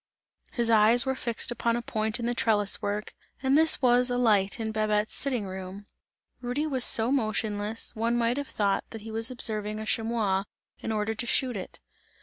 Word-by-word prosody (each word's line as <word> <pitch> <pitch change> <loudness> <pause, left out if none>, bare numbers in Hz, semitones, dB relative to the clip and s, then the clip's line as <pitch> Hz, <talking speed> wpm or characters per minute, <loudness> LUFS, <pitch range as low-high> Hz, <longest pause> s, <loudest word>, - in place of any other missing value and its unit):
His 235 -2 0
eyes 225 +3 +5
were 265 - 0
fixed 240 -1 -2
upon 235 0 0
a 240 - -2
point 220 0 -2
in 235 - -3
the 240 - 0
trellis 210 -4 +1
work, 205 +1 -3 0.3
and 265 +1 +3
this 315 -2 +4
was 250 0 +4
a 245 - -1
light 205 -5 +2
in 220 -1 -3
Babette's 215 0 0
sitting 255 -7 +1
room. 190 +1 -8 0.6
Rudy 250 +5 -2
was 265 -5 0
so 230 +1 +5
motionless, 215 -3 -1
one 230 +2 0
might 235 +2 0
have 285 -1 -3
thought 200 -2 0
that 225 - -9
he 220 +1 -9
was 225 +1 +1
observing 215 -4 -1
a 220 - -5
chamois, 215 -4 0 0.3
in - - -4
order 215 0 -1
to 225 +2 -3
shoot 255 0 0
it. 190 - -8
225 Hz, 190 wpm, -27 LUFS, 210-245 Hz, 0.6 s, eyes